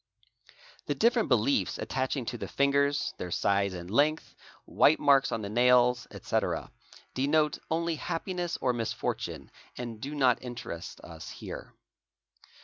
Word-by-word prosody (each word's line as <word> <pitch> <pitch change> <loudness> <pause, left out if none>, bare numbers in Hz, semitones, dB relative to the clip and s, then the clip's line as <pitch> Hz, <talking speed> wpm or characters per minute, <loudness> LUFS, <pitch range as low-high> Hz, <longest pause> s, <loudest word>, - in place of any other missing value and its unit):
The - - 0
different 235 -1 +3
beliefs 125 +2 +2
attaching 130 -1 -2
to 120 - -4
the - - -4
fingers, 140 +1 +1
their 90 - -4
size 100 +1 +1
and 90 +1 -7
length, 150 +6 +2 0.3
white 155 - +4
marks 140 -2 +4
on 115 - -2
the - - -3
nails, 125 +2 +4
etc., - - -2 0.4
denote 150 +3 +2
only 165 0 0
happiness 175 +1 -3
or 125 - +2
misfortune, 115 -2 -3 0.3
and 115 -3 -6
do 145 +2 -5
not 130 -4 +3
interest 120 -9 -7
us - - -10
here. - - -8
130 Hz, 135 wpm, -29 LUFS, 120-150 Hz, 0.4 s, white